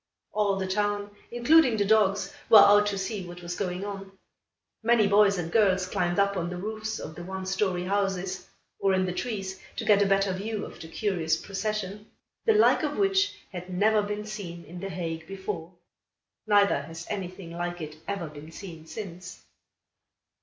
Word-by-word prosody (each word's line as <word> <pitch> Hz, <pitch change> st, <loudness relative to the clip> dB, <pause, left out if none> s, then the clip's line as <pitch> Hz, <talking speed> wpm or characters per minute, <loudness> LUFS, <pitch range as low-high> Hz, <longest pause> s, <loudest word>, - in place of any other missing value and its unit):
All 210 Hz, -2 st, +1 dB
the 190 Hz, -1 st, -2 dB
town, 205 Hz, +1 st, -1 dB, 0.2 s
including 240 Hz, +1 st, +4 dB
the 205 Hz, -, +2 dB
dogs, 210 Hz, +3 st, +3 dB, 0.2 s
were 220 Hz, -, +10 dB
out 205 Hz, 0 st, +7 dB
to 200 Hz, -1 st, -1 dB
see 195 Hz, +1 st, -3 dB
what 175 Hz, 0 st, -10 dB
was 175 Hz, 0 st, -4 dB
going 185 Hz, 0 st, -3 dB
on. 195 Hz, -1 st, -6 dB, 0.7 s
Many 230 Hz, -1 st, +4 dB
boys 200 Hz, 0 st, +5 dB
and 165 Hz, -2 st, -3 dB
girls 190 Hz, -4 st, +3 dB
climbed 175 Hz, -1 st, -1 dB
up 200 Hz, 0 st, +3 dB
on 175 Hz, -2 st, -2 dB
the 180 Hz, -, -5 dB
roofs 215 Hz, +3 st, -4 dB
of 155 Hz, -, -7 dB
the 175 Hz, -, -8 dB
one 190 Hz, +1 st, -5 dB
story 190 Hz, -1 st, 0 dB
houses, 190 Hz, -1 st, -1 dB, 0.3 s
or 195 Hz, -1 st, +3 dB
in 185 Hz, 0 st, +2 dB
the 180 Hz, -, -2 dB
trees 195 Hz, -3 st, -4 dB, 0.2 s
to 225 Hz, -, -4 dB
get 205 Hz, -2 st, +5 dB
a 200 Hz, -, +4 dB
better 195 Hz, -1 st, +2 dB
view 210 Hz, +3 st, -3 dB
of -, -, -11 dB
the 160 Hz, -, -8 dB
curious 170 Hz, -4 st, 0 dB
procession 205 Hz, +1 st, -4 dB, 0.4 s
the 445 Hz, -, +5 dB
like 430 Hz, -, +5 dB
of -, -, -2 dB
which 390 Hz, 0 st, +2 dB, 0.2 s
had 180 Hz, -1 st, -7 dB
never 210 Hz, +4 st, +3 dB
been 210 Hz, +1 st, -4 dB
seen 185 Hz, -6 st, -7 dB
in 175 Hz, +3 st, -9 dB
The 195 Hz, +2 st, -5 dB
Hague 165 Hz, -3 st, -4 dB
before. 190 Hz, -3 st, -5 dB, 0.8 s
Neither 205 Hz, -1 st, +4 dB
has 165 Hz, +1 st, -8 dB
anything 185 Hz, -3 st, -5 dB
like 175 Hz, +1 st, -4 dB
it 155 Hz, -1 st, -7 dB
ever 200 Hz, -4 st, -2 dB
been 150 Hz, +1 st, -11 dB
seen 165 Hz, -3 st, -10 dB
since. 180 Hz, -3 st, -8 dB
195 Hz, 180 wpm, -27 LUFS, 180-210 Hz, 0.8 s, were